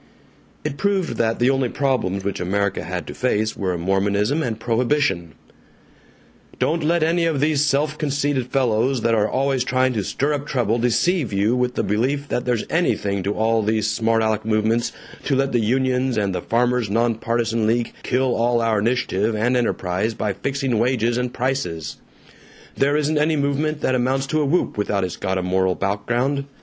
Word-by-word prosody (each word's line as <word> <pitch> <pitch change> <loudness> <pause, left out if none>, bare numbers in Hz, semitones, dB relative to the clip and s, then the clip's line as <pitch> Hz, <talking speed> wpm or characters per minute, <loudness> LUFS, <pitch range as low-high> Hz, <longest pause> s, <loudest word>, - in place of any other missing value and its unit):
It 140 - -3
proved 195 0 0
that 115 0 +1
the 125 +2 +3
only 135 -2 0
problems 120 -9 -1
which 100 0 -3
America 100 +2 -1
had 90 +2 -4
to - - -7
face 110 -4 0
were 90 -3 -2
Mormonism 100 - +1
and 115 -6 -3
Prohibition: 120 - 0 1.2
"Don't 165 +1 0
let 170 +1 +2
any 165 +1 +2
of 160 -4 0
these 150 0 +2
self 150 +1 0
conceited 140 -3 0
fellows 125 0 +1
that 115 +1 +2
are 110 -1 +2
always 135 -1 0
trying 130 0 +1
to 105 -4 -1
stir 140 +9 -1
up 145 0 -3
trouble 120 -5 0
deceive 125 +5 +1
you 100 +4 +1
with 125 0 0
the - - 0
belief 135 +7 -1
that 125 - -1
there's 120 -3 0
anything 100 - 0
to 100 +2 -2
all 115 +1 +2
these 110 0 0
smart 115 +1 +1
aleck 110 -1 0
movements 110 +2 +1 0.3
to 140 - +1
let 135 +1 +1
the 120 - +2
unions 130 +2 +1
and 100 -3 0
the - - -2
Farmers' 120 -1 +1
Nonpartisan 115 0 0
League 115 +1 0
kill 130 0 +1
all 120 +1 +2
our 115 -2 +1
initiative 110 -2 0
and 120 +4 +1
enterprise 110 -2 -1
by 105 -2 -1
fixing 135 -1 -1
wages 120 -1 +1
and 125 0 -1
prices. 125 - -3 0.8
There 145 +2 +2
isn't 150 0 +1
any 155 +1 +2
movement 145 +1 -1
that 130 - +1
amounts 130 +2 +1
to 155 +1 +1
a - - +1
whoop 145 -6 0
without 100 -1 0
it's 90 - -3
got 95 0 -2
a 95 - -1
moral 95 0 +1
background. 120 +8 -1
120 Hz, 180 wpm, -21 LUFS, 110-135 Hz, 1.2 s, the